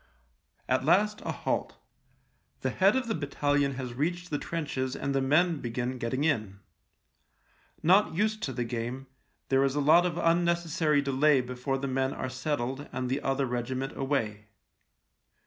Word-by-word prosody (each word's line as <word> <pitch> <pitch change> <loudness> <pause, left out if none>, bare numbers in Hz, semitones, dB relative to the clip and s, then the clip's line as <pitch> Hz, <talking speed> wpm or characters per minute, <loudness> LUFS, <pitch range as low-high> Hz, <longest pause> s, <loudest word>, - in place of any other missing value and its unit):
At - - +1
last 210 +2 +3
a - - -3
halt. - - -2 0.8
The - - -1
head 195 +4 +4
of 260 -2 0
the 225 - 0
battalion 145 -2 0
has 125 -2 -5
reached 175 +6 -2
the 145 - 0
trenches 135 -6 -3
and 140 0 -2
the 135 - +1
men 155 +4 +3
begin 125 +2 -3
getting 125 +4 -1
in. 110 -11 0 1.2
Not 185 +2 +4
used 215 +3 0
to 135 - -2
the 125 -1 -2
game, 120 +3 -4 0.4
there 135 0 +4
is 135 0 +1
a - - +1
lot 160 +5 +5
of 170 -1 -4
unnecessary 170 -3 +2
delay 140 +1 +3
before 125 +2 -2
the 140 +1 -3
men 135 0 -1
are 130 - -3
settled 130 +1 -3
and 125 0 -3
the 140 +2 0
other 135 0 0
regiment 130 +2 -3
away. 115 -7 -2
140 Hz, 160 wpm, -29 LUFS, 130-160 Hz, 1.2 s, lot